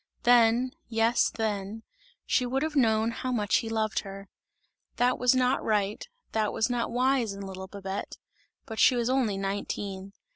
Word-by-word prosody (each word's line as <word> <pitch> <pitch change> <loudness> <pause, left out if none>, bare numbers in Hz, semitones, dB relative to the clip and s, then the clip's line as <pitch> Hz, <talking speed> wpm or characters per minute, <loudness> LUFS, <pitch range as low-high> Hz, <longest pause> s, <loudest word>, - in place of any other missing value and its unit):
Then, 240 +1 +4 0.2
yes 225 +1 +2
then, 215 0 -3 0.4
she 255 - +2
would 260 +3 -1
have 310 -1 -3
known 225 -3 +3
how 255 +2 -4
much 210 -5 +2
he 225 - -3
loved 220 -1 0
her. 195 0 -9 0.7
That 245 +1 +1
was 250 +1 +4
not 255 +1 +2
right, 210 - -1 0.2
that 215 -1 0
was 225 +2 0
not 240 -1 -1
wise 250 -2 +1
in 200 - -8
little 190 -1 -7
Babette; 195 0 -6 0.5
but 220 -4 -7
she 255 - +6
was 240 +1 0
only 240 -7 +1
nineteen! 195 0 -4
225 Hz, 160 wpm, -28 LUFS, 200-245 Hz, 0.7 s, she